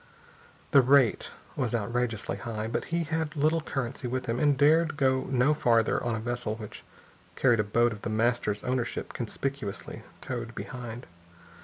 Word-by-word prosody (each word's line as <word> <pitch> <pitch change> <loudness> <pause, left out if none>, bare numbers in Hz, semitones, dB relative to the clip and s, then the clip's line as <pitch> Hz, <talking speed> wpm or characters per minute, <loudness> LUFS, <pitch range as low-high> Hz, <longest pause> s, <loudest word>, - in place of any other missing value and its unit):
The 140 - +8
rate 130 -2 +4 0.3
was 125 -4 -1
outrageously 115 0 -1
high. 110 -3 -4
But 110 - -2
he 170 0 -1
had 160 -1 -2
little 155 +3 +2
currency 130 -4 -3
with 130 +1 -2
him 120 0 -1
and 145 -2 +3
dared 155 +2 +4
go 130 -1 +2
no 130 +3 +3
farther 115 -6 +2
on 120 -2 0
a - - -3
vessel 120 -1 -2
which 110 -2 -9 0.5
carried 120 -4 +3
a - - +3
boat 115 +3 +2
of 105 -2 -7
The - - -3
Master's 110 -2 0
ownership 125 -1 -2
conspicuously 125 -2 -4 0.2
towed 120 -2 -5
behind. 120 -1 -7
120 Hz, 160 wpm, -28 LUFS, 115-140 Hz, 0.5 s, The